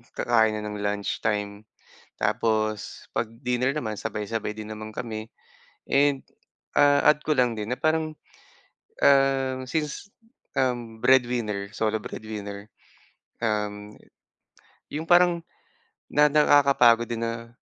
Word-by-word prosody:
kakain 110 -2 +3
na 105 - -4
ng 105 0 -5
lunchtime. 105 0 -2 0.6
Tapos 110 -2 -1
’pag 115 - -1
dinner 125 +1 0
naman 115 -8 -3
sabay-sabay 105 +1 -3
din 110 0 -8
naman 110 0 -7
kami, 110 -2 -6 0.6
and, 140 -1 +3 0.6
ah, 145 0 +5
add 150 - +1
ko 155 - +1
lang 125 -2 +3
din 105 +3 -3
na - - -19
parang, 155 0 0 0.9
um, 135 -1 +4
since, 150 +7 -3 0.5
um, 120 -4 -1
breadwinner, 120 -6 +2
solo 110 0 0
breadwinner, 105 -1 -7 0.7
um, 105 -1 -2 1.0
’yong 155 +2 -3
parang, 175 -1 +4 0.7
na 150 +1 +4
nakakapagod 140 -5 +5
din 115 -1 -3
na 115 0 -6
115 Hz, 110 wpm, -25 LUFS, 105-135 Hz, 1.0 s, ah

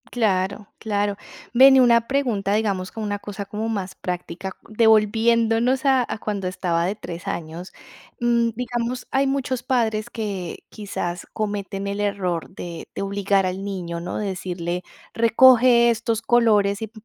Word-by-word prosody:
Claro, 200 -3 0
claro. 205 -2 -1 0.4
Ven 265 +2 +8
y - - +7
una 235 -2 +5
pregunta, 240 -8 0
digamos, 200 -4 -1
como 220 -1 -5
una 205 -1 -2
cosa 200 0 -7
como 215 +3 -4
más 195 -4 -4
práctica, 180 +1 -5
devolviéndonos 225 +3 +3
a 265 -2 +4
a - - -3
cuando 205 -3 -3
estaba 175 -2 -1
de 195 +3 -1
3 175 -5 -8
años, 170 +2 -5 0.5
mm, 235 -1 +2
digamos, 245 +1 -3
hay 270 +1 +2
muchos 260 -2 -2
padres 230 -5 0
que 200 -6 -5
quizás 180 -4 -5
cometen 200 -2 -3
el 200 +1 -3
error 185 -5 -2
de 175 -2 -8
de - - -3
obligar 195 -1 +1
al 185 +1 -3
niño, 180 -4 -4
¿no?, 180 - -4
de 210 - -2
decirle: 180 -1 -4 0.3
"Recoge 235 +1 +6
estos 230 0 -1
colores 215 -4 +3
y 220 -1 -5
210 Hz, 150 wpm, -22 LUFS, 190-235 Hz, 0.5 s, Ven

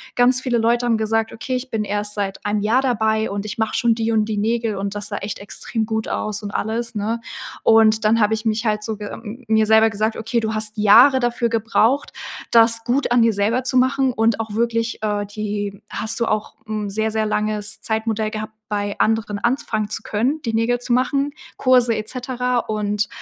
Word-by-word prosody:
ganz 250 +1 +4
viele 250 -3 0
Leute 235 +2 +1
haben 235 -2 +2
gesagt: 220 +1 -1
„Okay, 255 +3 -4
ich 255 +1 -4
bin 220 -1 -1
erst 205 0 -1
seit 200 -2 -3
1 205 0 0
Jahr 225 +5 +2
dabei 220 -4 0
und 200 +1 -4
ich 215 +1 -6
mache 220 -1 -1
schon 235 -1 +2
die 225 0 -1
und 215 -1 +2
die 215 -1 -3
Nägel 225 +1 0
und 195 0 -3
das 205 0 -1
sah 205 - -4
echt 200 +1 -5
extrem 220 +2 -3
gut 220 -1 -2
aus.“ 210 0 -3
Und 205 - -5
alles, 230 +3 -3
ne? 215 +3 -2 0.4
Und 220 -1 +4
dann 225 +2 +4
habe 210 0 +3
ich 220 +1 -7
mich 220 +1 0
halt 210 -1 0
so 220 -1 -4
ge 205 0 -7 0.4
mir 220 0 +3
selber 220 +1 +5
gesagt: 220 +1 -1
„Okay, 225 +2 -1
du 220 -1 -2
hast 215 0 0
Jahre 235 +6 +6
dafür 240 -1 0
gebraucht, 230 +4 +1 0.4
das 230 0 +5
gut 250 +3 0
an 245 -1 +4
dir 230 -1 +3
selber 215 +5 0
zu 255 0 0
machen 260 0 +2
und 225 -1 +1
auch 220 -2 -4
wirklich, 230 +1 -1
äh 210 -1 -1
die 205 -1 -4
hast 220 +2 -2
du 235 - +1
auch 215 0 -2
'n 215 -1 -3
sehr, 220 +2 0
sehr 220 0 0
langes 215 0 -1
Zeitmodell 220 -1 -1
gehabt, 215 0 -6
bei 205 -1 -3
anderen 220 -2 +1
anfangen 220 -3 -1
zu - - -3
können, 255 +9 -1
die 230 - -2
Nägel 230 +2 +1
zu 245 0 -2
machen, 275 +3 +1 0.3
Kurse 250 -2 +4
et 215 -1 -4
cetera 250 -1 -2
und, 210 -2 -2
220 Hz, 210 wpm, -20 LUFS, 210-235 Hz, 0.4 s, Jahre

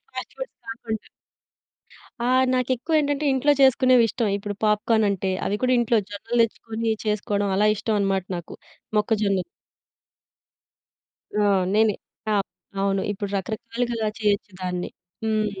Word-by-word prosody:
Fast - - -6
foods - - -6
కాకుండా. 225 -1 -5 1.2
ఆ! - - +2 0.2
నాకెక్కువేంటంటే, 285 +4 +1
ఇంట్లో 285 +3 +3
చేసుకునేవిష్టం. 255 -3 +4
ఇప్పుడు 205 0 -5
పాప్‌కార్నంటే, 210 -3 +2
అవి 205 - 0
కూడా 255 0 +3
ఇంట్లో 235 -1 +3
జొన్నలు 230 +4 -2
తెచ్చుకొని, 225 0 -2
చేసుకోడం 205 -1 0
అలా 210 +2 +4
ఇష్టవనమాట 200 -3 0
నాకు. 170 - -8 0.4
మొక్కజొన్నలు 210 -3 +1 1.9
ఆ! - - +3 0.3
నేనే. 215 -1 +4 0.4
ఆ! - - +3 0.5
అవును. 195 -1 +1
ఇప్పుడు 205 0 -4
రకరకాలుగా 230 +2 -2
చేయొచ్చు 205 -1 0
దాన్ని. 180 -1 -2 0.3
హ్మ్. 215 -1 +1
220 Hz, 110 wpm, -24 LUFS, 205-235 Hz, 1.9 s, చేసుకునేవిష్టం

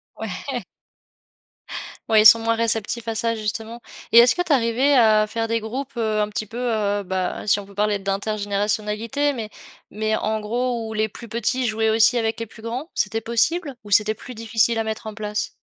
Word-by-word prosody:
Ouais. - - -5 1.5
Ouais, 215 -1 +6
ils - - +2
sont 230 +1 +10
moins 230 0 +1
réceptifs 230 0 -1
à 225 - -2
ça 230 +1 0
justement. 220 +2 -4 0.3
Et 230 - +10
est-ce 240 +1 +7
que 355 - -1
tu 345 -4 +1
es - - +7
arrivé 255 +4 +2
à 215 -3 +5
faire 225 +1 -3
des 230 0 +1
groupes, 255 +5 -5
heu, 215 -2 0
un 210 - -1
petit 210 +1 -3
peu 225 +3 -10
heu, 215 -4 0
bah, 185 -1 -3
si 205 - +3
on 200 - -8
peut 200 - -16
parler 205 0 +1
d'intergénérationnalité. 210 +6 -1
Mais 225 -4 -5 0.4
mais 215 +1 -1
en 215 0 -1
gros 235 +1 -2
où 220 - -6
les 215 0 0
plus 235 +3 -11
petits 235 +3 -1
jouaient 220 0 +1
aussi 225 +3 +4
avec 225 -1 -1
les 230 - -3
plus 220 0 -15
grands, 245 +8 -5
c'était 215 +2 0
possible 275 +6 0
ou 205 - -12
c'était 210 +2 +4
plus 250 +3 -10
difficile 225 +1 +1
à 225 - -1
mettre 220 0 -4
en 215 - -5
place? 210 0 -3
220 Hz, 205 wpm, -22 LUFS, 215-235 Hz, 1.5 s, sont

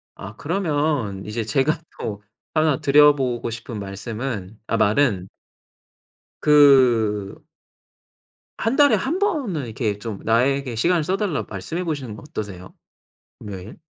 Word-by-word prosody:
아 100 +3 -9
그러면 145 - -1
이제 110 +2 -3
제가 135 +8 +1 0.2
또 105 -1 -5 0.3
1 155 -3 +2
드려 145 +1 +6
보고 125 -4 -2
싶은 115 -1 -6
말씀은 105 +1 -5
아 115 - 0
말은 105 -3 +2 1.1
그 125 -9 +4 1.2
1 225 +3 0
달에 285 0 +6
1 320 +8 -1
번은 275 - -1
이렇게 110 -2 -2
좀 105 -3 -6
나에게 125 +2 +1
시간을 170 +8 +2
써 185 +5 0
달라고 195 -7 -2
말씀해 110 - -4
보시는 140 -10 -4
건 125 - -12
어떠세요? 100 -8 -7 0.7
금요일? 100 +1 -8
125 Hz, 235 characters per minute, -22 LUFS, 105-150 Hz, 1.2 s, 드려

